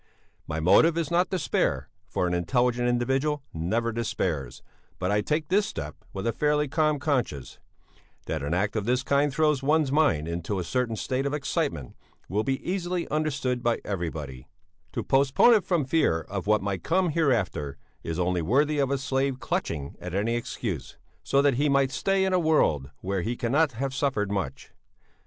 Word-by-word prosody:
"'My 80 0 -3
motive 160 - +5
is 165 -2 -1
not 175 +1 +2
despair, 185 -6 0 0.2
for - - -1
an 90 - 0
intelligent 120 +8 +1
individual 135 +4 0
never 110 +9 -1
despairs, 85 - -3 0.3
but 90 +1 -1
I 105 0 +2
take 150 +5 -1
this 200 +3 +3
step 75 +1 -6 0.2
with 95 - -5
a 115 - +1
fairly 150 +3 +1
calm 155 +1 +1
conscience; 130 - -2 0.7
that 80 - -3
an 70 +2 -3
act 100 +4 0
of 105 -2 -1
this 125 +2 +1
kind 140 +1 +2
throws 150 -1 +2
one's 150 0 +2
mind 140 - +2
into 85 +4 -3
a 90 - -1
certain 115 +6 -1
state 130 +5 -1
of 145 - -1
excitement 140 - -2 0.3
will 105 +4 0
be 135 +1 -2
easily 180 -1 -1
understood 140 -5 -1
by 120 -1 +1
everybody; 75 -9 -5 0.5
to - - -2
postpone 140 - +4
it 210 -5 +3
from 170 -7 +1
fear 130 - +2
of 100 +3 -6
what 105 -2 +3
might 100 -3 -2
come 180 +1 +1
hereafter 115 - 0 0.2
is 80 -1 -4
only 90 -1 0
worthy 145 - +2
of 135 -2 +2
a 140 - +1
slave 135 -1 -1
clutching 70 - -3
at 90 0 -5
any 105 +4 +1
excuse, 120 - -4 0.2
so 140 +1 +2
that 140 -4 +3
he 150 - +3
might 140 -1 +3
stay 195 +6 +1
in 190 - 0
a 185 - +4
world 115 - +2
where 95 0 -1
he 120 +6 -2
cannot 140 +4 +2
have 135 +3 -3
suffered 130 -7 0
much. 100 -2 -4
125 Hz, 180 wpm, -26 LUFS, 95-150 Hz, 0.7 s, motive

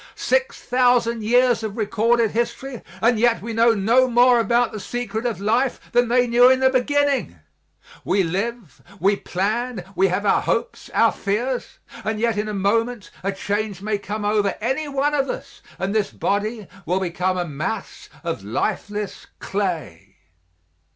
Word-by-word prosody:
Six - - 0
thousand 245 -2 +2
years 245 +2 +3
of 220 -1 -5
recorded 230 +1 +2
history 240 +2 -3 0.2
and 230 -1 +4
yet 235 0 +3
we 230 +1 -6
know 230 +1 +4
no 230 +6 +3
more 245 0 +5
about 235 0 +2
the 215 - -6
secret 225 +2 -3
of 230 - -3
life 235 +6 +1
than 245 0 +3
they 245 +1 +3
knew 245 +1 +6
in 260 0 +4
the 260 0 +4
beginning. 280 - +1 0.7
We 195 0 +2
live, 195 - -4 0.2
we 200 +2 +3
plan; 210 +3 -2
we 195 - +4
have 190 +3 -1
our - - +3
hopes, 480 - -2
our - - +5
fears; 240 +5 -3 0.3
and 220 0 -2
yet 230 -1 +1
in 210 +1 -2
a 210 - -3
moment 225 +3 0
a 195 - -1
change 205 0 -3
may 210 -1 -1
come 210 +1 -4
over 205 -1 +1
anyone 280 +4 -1
of 275 -2 0
us - - -7 0.2
and 195 +1 -2
this 215 -2 +1
body 210 +1 -2 0.2
will 180 +3 +1
become 185 0 -1
a 175 - -1
mass 165 +7 -5
of 165 - -3
lifeless 205 - -3
clay. 175 - -4
220 Hz, 160 wpm, -22 LUFS, 200-245 Hz, 0.7 s, knew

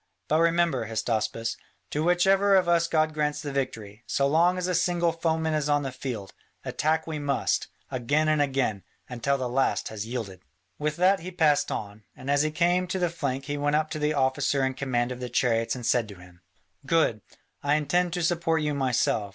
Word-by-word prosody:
But 155 - +2
remember, 165 -8 +2
Hystaspas, 115 0 -2 0.3
to 150 - -1
which 175 +2 +3
ever 195 +1 +4
of 185 -2 +3
us 170 -1 +3
God 155 -1 +1
grants 150 -1 -1
the 145 - -4
victory, 115 -5 -4
so 140 - +1
long 170 +6 +3
as 180 - -2
a 180 - 0
single 175 -1 +2
foeman 160 -1 -1
is 150 -1 0
on 145 0 +2
the 135 - -3
field, 125 -6 -6 0.3
attack 160 +1 0
we 155 -2 -4
must, 140 -2 0 0.2
again 145 +5 +1
and 155 -1 +3
again, 135 -8 0 0.3
until 130 +3 -1
the 130 -2 -2
last 130 +2 0
has 110 0 -6
yielded." 110 -6 -5 0.4
With 150 0 -1
that 185 +3 +3
he 175 +2 -7
passed 150 -5 +2
on, 105 0 -5
and 130 +2 -4
as 145 0 +3
he 155 - +1
came 175 +3 +1
to 185 - -2
the 175 -2 0
flank 140 -5 -3
he 145 0 -3
went 145 +1 +1
up 155 0 0
to 155 - -3
the 150 0 0
officer 135 0 +1
in 130 - -1
command 125 -2 -1
of 125 - -6
the 125 -1 -5
chariots 115 -1 +1
and 125 -2 -6
said 120 -2 +2
to 100 - -10
him: 90 0 -16 0.4
"Good, 135 -7 +1 0.4
I 145 +1 +2
intend 175 +4 +1
to 175 -2 -1
support 165 -1 +1
you 150 0 0
myself. 125 -6 0
145 Hz, 210 wpm, -26 LUFS, 125-165 Hz, 0.4 s, ever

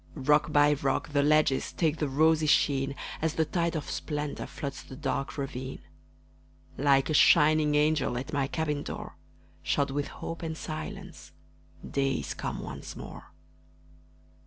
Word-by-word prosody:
Rock 150 +2 +2
by 145 0 +5
rock 140 -1 -1
the 145 -1 +2
ledges 150 -2 +3
Take 160 -2 0
the 150 -3 -1
rosy 155 +2 +3
sheen, 140 -2 +2 0.3
As 160 0 0
the 160 - +2
tide 170 +1 -1
of 150 - -3
splendor 150 -1 -4
Floods 140 -3 -6
the 130 - -11
dark 135 +2 -3
ravine. 130 -2 -5 0.9
Like 135 +1 +3
a - - +1
shining 150 0 +5
angel 150 -4 +2
At 135 +5 -5
my 140 -2 +1
cabin 150 0 -2
door, - - -7 0.5
Shod 140 -1 0
with 145 +1 -2
hope 165 - -7
and 160 -1 -4
silence, 155 -1 -7 0.5
Day 135 -1 0
is - - -3
come - - -5
once - - -7
more. - - -9
150 Hz, 150 wpm, -29 LUFS, 140-155 Hz, 0.9 s, by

